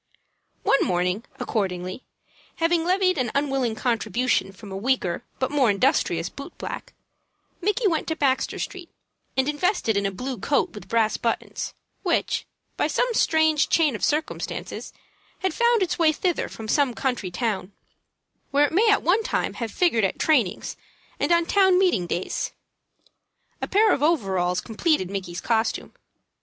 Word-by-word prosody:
One 275 - +4
morning, 180 +4 0
accordingly, 185 0 -2 0.5
having 330 0 +2
levied 370 -1 +2
an 250 -2 0
unwilling 270 -5 0
contribution 245 -2 0
from 200 +1 -12
a - - -5
weaker 200 -3 0
but 260 +1 -1
more 275 -5 +3
industrious 250 +8 +2
boot - - -10
black, - - -6 0.7
Micky 415 +4 +1
went 325 -4 0
to 320 - -1
Baxter 270 -4 +1
Street, 365 -4 -6 0.5
and 265 0 +2
invested 295 - +1
it - - +3
in 200 - 0
a - - -3
blue 250 +4 -5
coat 280 +8 +1
with 205 -4 -10
brass 220 0 +2
buttons, 230 - -3 0.3
which, - - 0 0.3
by - - +2
some - - 0
strange 315 -6 +3
chain 305 -7 +3
of - - -7
circumstances, 305 +2 -2 0.5
had 375 - +1
found 470 -3 +3
its 350 -1 -2
way 320 -2 +5
thither 350 +3 -1
from 220 - -8
some 265 0 +2
country 245 -8 -1
town, 195 -1 -2 0.8
where 285 +1 +4
it 290 - -4
may 430 +6 +4
at 415 - +3
one 390 +6 +3
time - - -1
have 230 -2 -4
figured 235 - +2
at 195 - 0
trainings 235 - +1 0.4
and - - 0
on 340 0 +4
town 380 0 +4
meeting 350 - +2
days. 175 +2 -2 1.1
A - - -2
pair 425 +2 +4
of - - -1
overalls 190 - +1
completed 225 - 0
Micky's 185 -3 -4
costume. 225 -1 0
265 Hz, 155 wpm, -24 LUFS, 210-335 Hz, 1.1 s, way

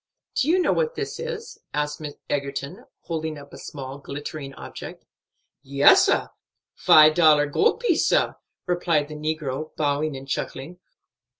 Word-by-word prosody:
"Do 265 - 0
you 340 +4 +4
know 365 - +2
what 485 0 0
this - - -4
is?" 475 -1 -6 0.2
asked 150 +1 -2 0.3
Egerton, 140 0 -4 0.2
holding 160 -2 -4
up 140 0 -13
a - - -9
small 135 -1 -8
glittering 140 0 -7
object. - - -9 0.6
"Yes, 140 +1 +5
sah; - - +1 0.4
five 155 0 +6
dollar 155 -3 +5
gold 435 - +1
piece, 395 -10 +2
sah," - - +2 0.3
replied 170 -4 0
the - - -7
negro, 155 -1 -4
bowing 145 0 0
and 135 +1 -10
chuckling. 140 +5 -5
155 Hz, 140 wpm, -24 LUFS, 140-175 Hz, 0.6 s, five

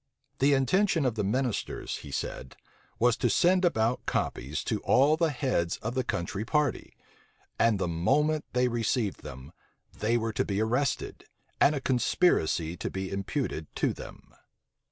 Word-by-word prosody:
The 140 +1 +4
intention 165 +4 +2
of 125 - +1
the 110 -1 -2
ministers, 125 +3 -2
he 75 - -10
said, 65 -1 -5 0.4
was 120 0 +3
to - - +1
send 185 +1 +3
about 120 -8 +1
copies - - -2
to - - -1
all 140 +4 +4
the 165 0 +1
heads 125 - -1
of 115 +2 -4
the 130 0 0
country 95 -2 -3
party; 150 +2 -1 0.6
and 115 -2 +4
the 95 - -1
moment 150 - +1
they 125 0 +3
received 115 -3 -1
them, 65 +3 -10 0.4
they 115 +3 +1
were 115 -1 -2
to - - +1
be 100 -1 -2
arrested, 125 +5 -1 0.3
and 150 - +5
a - - -1
conspiracy 120 - +1
to - - -3
be 95 0 -5
imputed 100 - -3
to - - +1
them. - - -12
120 Hz, 155 wpm, -28 LUFS, 100-140 Hz, 0.6 s, and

